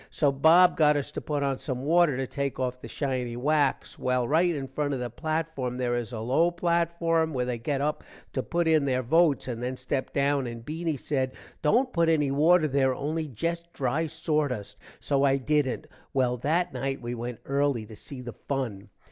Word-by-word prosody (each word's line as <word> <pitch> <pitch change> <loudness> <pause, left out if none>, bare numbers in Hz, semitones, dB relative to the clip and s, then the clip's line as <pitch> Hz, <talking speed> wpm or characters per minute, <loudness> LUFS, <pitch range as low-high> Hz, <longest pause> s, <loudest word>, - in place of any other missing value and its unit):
so 145 -3 +2
Bob 165 +6 +6
got 150 -2 +5
us 145 0 -3
to - - -5
put 145 -2 -2
on 135 -2 -1
some 130 -3 -4
water 165 -2 +3
to 135 - -1
take 140 +1 -3
off 125 0 -2
the - - -8
shiny 125 -4 -2
wax. 145 +2 0
well 125 -1 +1
write 170 +4 +3
in 135 -2 -4
front 145 0 -2
of - - -4
the 120 -2 -4
platform 155 -3 -2
there 125 -1 0
is 120 -1 -2
a 115 - -5
low 135 +10 +2
platform 170 -1 +1
where 125 -1 0
they 125 -2 -3
get 140 +3 -1
up 150 +1 -1 0.3
to 130 - 0
put 170 +4 -1
in 160 -2 +4
their 130 -1 0
votes 160 +2 +3
and 120 -2 -4
then 125 +1 -3
step 130 +1 -3
down 140 -1 +1
and 115 -1 -7
Beany 160 +1 -2
said, 130 -1 -1 0.3
dont 245 - +2
put 170 -1 +3
any 150 -4 +2
water 155 +3 +4
there 135 -2 +2
only 155 +3 -2
jest 170 +6 -3
dry 140 +5 0
sordust. 150 - -2 0.2
so 140 -1 +1
i 135 -1 +4
dident. 145 +1 0 0.3
well 125 -2 +2
that 165 +6 0
night 135 +2 -2
we 120 0 -5
went 120 0 -6
erly 140 -5 0
to 110 - -11
see 130 +4 -9
the 120 -2 -7
fun. 115 -8 -4
140 Hz, 205 wpm, -27 LUFS, 125-160 Hz, 0.3 s, Bob